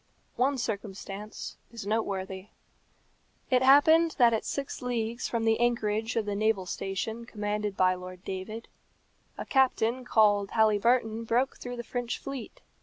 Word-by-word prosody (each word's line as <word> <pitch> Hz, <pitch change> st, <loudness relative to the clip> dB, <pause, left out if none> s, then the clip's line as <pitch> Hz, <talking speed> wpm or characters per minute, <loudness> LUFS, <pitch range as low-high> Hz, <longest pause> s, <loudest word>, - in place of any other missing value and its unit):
One 270 Hz, +3 st, +1 dB
circumstance 205 Hz, -2 st, -5 dB
is 230 Hz, -4 st, -8 dB
noteworthy. 195 Hz, -3 st, -2 dB, 1.0 s
It 250 Hz, -1 st, +4 dB
happened 315 Hz, +5 st, +6 dB
that 240 Hz, -4 st, +5 dB
at 220 Hz, -, -1 dB
six 280 Hz, -1 st, -4 dB
leagues 235 Hz, -1 st, -2 dB
from 230 Hz, -1 st, -1 dB
the 225 Hz, 0 st, +3 dB
anchorage 225 Hz, -1 st, 0 dB
of 225 Hz, -2 st, 0 dB
the 205 Hz, -, -2 dB
naval 215 Hz, -2 st, +1 dB
station 195 Hz, +5 st, -4 dB
commanded 210 Hz, -2 st, -3 dB
by 185 Hz, 0 st, +4 dB
Lord 185 Hz, 0 st, -9 dB
David, 205 Hz, +4 st, -6 dB, 0.7 s
a -, -, -5 dB
captain 255 Hz, -2 st, +2 dB
called 205 Hz, -4 st, +3 dB
Halyburton 220 Hz, +1 st, +2 dB
broke 245 Hz, +4 st, +1 dB
through 245 Hz, 0 st, -6 dB
the 240 Hz, -, -5 dB
French 245 Hz, 0 st, -3 dB
fleet. 275 Hz, -4 st, -7 dB
225 Hz, 140 wpm, -28 LUFS, 205-245 Hz, 1.0 s, happened